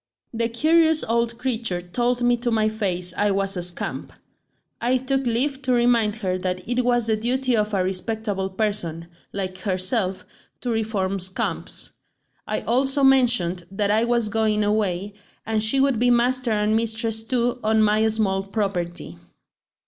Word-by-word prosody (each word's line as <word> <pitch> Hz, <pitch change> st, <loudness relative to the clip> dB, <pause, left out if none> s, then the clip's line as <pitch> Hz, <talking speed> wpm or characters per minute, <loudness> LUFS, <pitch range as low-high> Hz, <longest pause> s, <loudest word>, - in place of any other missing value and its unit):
"The 230 Hz, 0 st, -1 dB
curious 315 Hz, +5 st, +3 dB
old 235 Hz, +1 st, 0 dB
creature 235 Hz, -7 st, -1 dB
told 240 Hz, +7 st, -1 dB
me 245 Hz, 0 st, +4 dB
to 240 Hz, +1 st, -2 dB
my 220 Hz, -2 st, +2 dB
face 180 Hz, -5 st, -2 dB
I 205 Hz, -, +1 dB
was 195 Hz, 0 st, 0 dB
a 180 Hz, -, -2 dB
scamp. 175 Hz, 0 st, -4 dB, 0.7 s
I 250 Hz, +2 st, +2 dB
took 265 Hz, 0 st, -1 dB
leave 265 Hz, +4 st, +1 dB
to 260 Hz, -1 st, +1 dB
remind 235 Hz, -3 st, +3 dB
her 185 Hz, 0 st, 0 dB
that 185 Hz, 0 st, -3 dB
it 245 Hz, +1 st, 0 dB
was 240 Hz, -1 st, +2 dB
the 220 Hz, -1 st, +2 dB
duty 250 Hz, +3 st, +1 dB
of 210 Hz, -1 st, 0 dB
a 195 Hz, -3 st, +1 dB
respectable 195 Hz, +1 st, -2 dB
person, 190 Hz, -5 st, -2 dB, 0.3 s
like 185 Hz, -1 st, -3 dB
herself, 190 Hz, 0 st, -1 dB, 0.4 s
to 245 Hz, -, -2 dB
reform 210 Hz, -4 st, -1 dB
scamps; 185 Hz, +1 st, -3 dB, 0.5 s
I -, -, -2 dB
also 270 Hz, +4 st, +1 dB
mentioned 240 Hz, -10 st, +3 dB
that 200 Hz, +1 st, +1 dB
I 220 Hz, +2 st, +3 dB
was 235 Hz, -2 st, +1 dB
going 215 Hz, -1 st, +1 dB
away, 205 Hz, -2 st, 0 dB, 0.3 s
and 220 Hz, -1 st, 0 dB
she 220 Hz, +5 st, +3 dB
would 270 Hz, -4 st, +2 dB
be 245 Hz, +1 st, +3 dB
master 245 Hz, +1 st, +2 dB
and 210 Hz, 0 st, +1 dB
mistress 225 Hz, 0 st, 0 dB
too 245 Hz, +1 st, 0 dB
on 220 Hz, 0 st, +3 dB
my 215 Hz, +1 st, +3 dB
small 210 Hz, -3 st, +1 dB
property. 180 Hz, -, -4 dB
220 Hz, 160 wpm, -23 LUFS, 195-240 Hz, 0.7 s, me